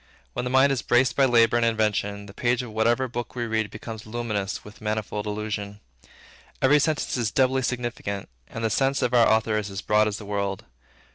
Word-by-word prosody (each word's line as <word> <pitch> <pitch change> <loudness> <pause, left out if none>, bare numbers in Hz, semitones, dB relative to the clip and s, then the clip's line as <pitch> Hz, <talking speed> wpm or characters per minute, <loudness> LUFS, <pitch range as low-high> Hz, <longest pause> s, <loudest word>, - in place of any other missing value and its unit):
When 125 - -3
the - - -1
mind 130 +2 +5
is 135 - 0
braced 125 0 +2
by 135 - +4
labor 120 -2 +4
and 120 - +2
invention, 105 -3 0
the 100 - -12
page 120 +3 0
of 120 - -8
whatever 115 +4 +1
book 120 0 -6
we 120 -1 -2
read 110 -2 -1
becomes 110 0 -8
luminous 110 -4 -3
with 105 +1 -13
manifold 105 -1 -3
allusion. 105 -1 -4 0.8
Every 145 +3 +5
sentence 150 -2 0
is 115 -3 0
doubly 130 +3 +2
significant, 120 -6 -3 0.2
and 115 - -6
the 110 - +1
sense 135 +5 +1
of 125 - 0
our 120 -2 +5
author 110 -1 +2
is 105 -1 -5
as 95 0 -5
broad 105 0 +3
as 105 -1 -2
the 105 - -9
world. 100 -1 -3
110 Hz, 205 wpm, -25 LUFS, 105-125 Hz, 0.8 s, mind